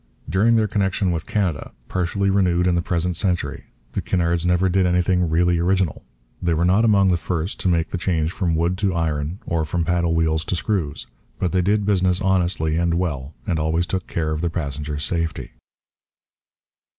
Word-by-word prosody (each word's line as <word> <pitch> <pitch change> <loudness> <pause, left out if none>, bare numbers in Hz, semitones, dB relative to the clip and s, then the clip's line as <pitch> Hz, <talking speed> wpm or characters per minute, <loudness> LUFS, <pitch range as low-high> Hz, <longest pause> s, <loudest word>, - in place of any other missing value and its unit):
During 100 +9 +3
their 110 -1 +3
connection 95 -2 0
with 80 -2 -3
Canada, 90 -8 -1
partially 95 +2 0
renewed 90 -3 +2
in 90 - +3
the 85 - +1
present 85 +1 -1
century, 90 -1 -2 0.3
the - - -2
Cunards 85 -1 0
never 90 +1 +3
did 95 0 +2
anything 90 0 +2
really 85 +1 +2
original. 90 -2 0 0.4
They 85 -2 +1
were 85 +2 +1
not 95 +5 +4
among 100 -4 +4
the 90 - +2
first 85 +1 -3
to - - -1
make 85 -2 +1
the 90 - -3
change 85 -3 0
from 90 -4 -1
wood 85 +3 0
to 100 -4 0
iron 80 0 -1
or 85 -1 0
from 85 +2 -1
paddle 85 -1 +1
wheels 80 -1 +1
to - - -1
screws. 85 -6 -2 0.3
But 90 - -1
they 95 - +2
did 100 +3 +1
business 95 -3 +2
honestly 90 -5 +1
and 85 0 +1
well 75 -5 -3
and 85 -7 -1
always 80 +3 +1
took 95 +1 -3
care 80 -2 -2
of 75 0 -2
their 85 - 0
passengers' 75 -2 -4
safety. 80 -1 -2
85 Hz, 185 wpm, -22 LUFS, 80-95 Hz, 0.4 s, not